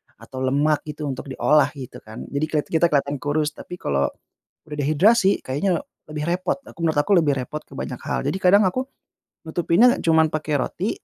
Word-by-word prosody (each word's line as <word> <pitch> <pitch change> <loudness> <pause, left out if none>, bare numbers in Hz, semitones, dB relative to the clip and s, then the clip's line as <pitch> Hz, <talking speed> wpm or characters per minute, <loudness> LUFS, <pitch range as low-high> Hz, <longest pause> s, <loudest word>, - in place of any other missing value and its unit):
atau 130 - -10
lemak 145 +4 +1
gitu 150 0 -6
untuk 140 -1 -4
diolah 145 +2 +3
gitu 130 -3 -9
kan. 110 0 -10
Jadi 140 +2 0
keliat 150 -1 -1 0.3
kelihatan 140 0 0
kurus, 150 +2 0
tapi 180 - -9
kalau 70 - 0 0.6
udah 150 - -7
dehidrasi, 190 +8 +3
kayaknya 165 +7 -1 0.2
lebih 150 0 -5
repot. 180 +1 0
Aku - - -15
menurut 160 -1 +1
aku 150 - 0
lebih 145 -4 +2
repot 135 +4 -4
ke 135 - -15
banyak 125 -2 -5
hal. - - -2
Jadi 145 +7 -1
kadang 190 +3 +5
aku 255 +7 -2 0.6
nutupinnya 175 +10 +3
cuman 160 -1 +4
pakai 155 -1 -1
roti, 175 - -2
150 Hz, 180 wpm, -22 LUFS, 140-175 Hz, 0.6 s, kadang